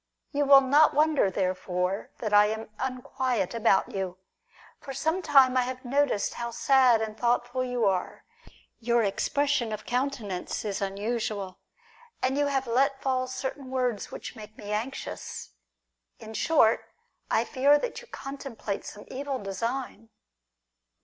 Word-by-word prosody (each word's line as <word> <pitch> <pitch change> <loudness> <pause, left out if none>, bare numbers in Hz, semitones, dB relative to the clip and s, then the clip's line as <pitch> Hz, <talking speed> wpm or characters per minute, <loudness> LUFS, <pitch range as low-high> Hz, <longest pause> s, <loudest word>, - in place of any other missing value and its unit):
You 290 0 +1
will 275 -1 +8
not 285 +4 +4
wonder 300 -8 +3
therefore 185 0 -1
that 215 -3 -2
I 205 0 +7
am 220 0 -4
unquiet 255 -5 -2
about 230 0 +2
you. 190 -2 -3 0.6
For 270 - -8
some 320 +7 0
time 270 -6 +5
I 255 - +4
have 255 +1 -5
noticed 275 -4 +1
how 235 0 -4
sad 250 -2 +4
and 215 -1 -5
thoughtful 245 +2 0
you 245 -3 0
are; 190 -2 -1 0.5
your 235 0 +2
expression 275 +4 0
of 215 0 -5
counten 250 -4 -2
ance 180 +4 -4
is 205 -2 -3
unusual, 200 -1 -3 0.6
and 260 +1 0
you 290 0 +2
have 270 -1 0
let 270 +3 +2
fall 255 -1 0
certain 260 +1 -5
words 250 -5 -1
which - - -7
make 215 -1 -11
me 205 0 -7
anxious. 225 - -5 0.7
In 220 - -10
short, 225 -1 +3 0.5
I - - +2
fear 280 +2 +4
that 485 - -4
you 485 - -15
contemplate 270 - -6
some 210 - -10
evil 275 +1 -4
design. 230 +3 -4
245 Hz, 145 wpm, -27 LUFS, 210-270 Hz, 0.7 s, will